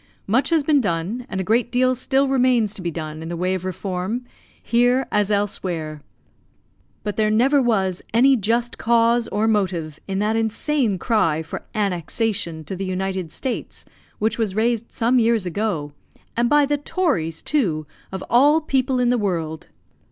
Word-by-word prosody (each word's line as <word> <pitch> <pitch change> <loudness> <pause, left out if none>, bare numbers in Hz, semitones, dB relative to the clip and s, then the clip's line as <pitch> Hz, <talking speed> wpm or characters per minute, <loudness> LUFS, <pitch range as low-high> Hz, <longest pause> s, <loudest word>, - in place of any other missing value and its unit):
Much 250 +7 +1
has 325 -3 +2
been 290 -1 +3
done, 200 +5 -2
and 190 - -3
a - - 0
great 230 +4 +1
deal 255 +1 +3
still 270 +2 +1
remains 250 -5 +2
to 200 - -6
be 175 - -2
done 155 -1 -6
in 165 - -6
the 170 0 -4
way 185 +2 0
of 185 -2 -3
reform, 185 +5 -3 0.3
here 245 +2 +2
as 210 -1 +1
elsewhere. 175 -7 -2 1.0
But 210 -2 -4
there 215 -1 +2
never 260 +6 +4
was 195 -7 +1
any 265 +4 +5
just 235 +2 -1
cause 235 0 +3
or 210 +2 0
motive 180 -8 -1
in 190 -1 -2
that 210 +2 +1
insane 225 0 0
cry 170 -7 +1
for 160 - -8
"annexation" 190 -3 -1
to 190 - -6
the 190 - -4
United 185 -2 -3
States, 260 -3 -4 0.3
which 220 +2 -1
was 210 -4 -1
raised 230 +1 0
some 245 +2 +2
years 230 -3 +2
ago, 180 -5 -2 0.4
and 235 0 +2
by 295 +1 +5
the 290 +1 0
tories, 275 - -1
too, 175 - 0 0.3
of 190 0 -5
all 285 +6 +5
people 265 -4 0
in 245 -1 +2
the 245 -1 +2
world! 165 -6 -2
215 Hz, 170 wpm, -22 LUFS, 185-245 Hz, 1.0 s, any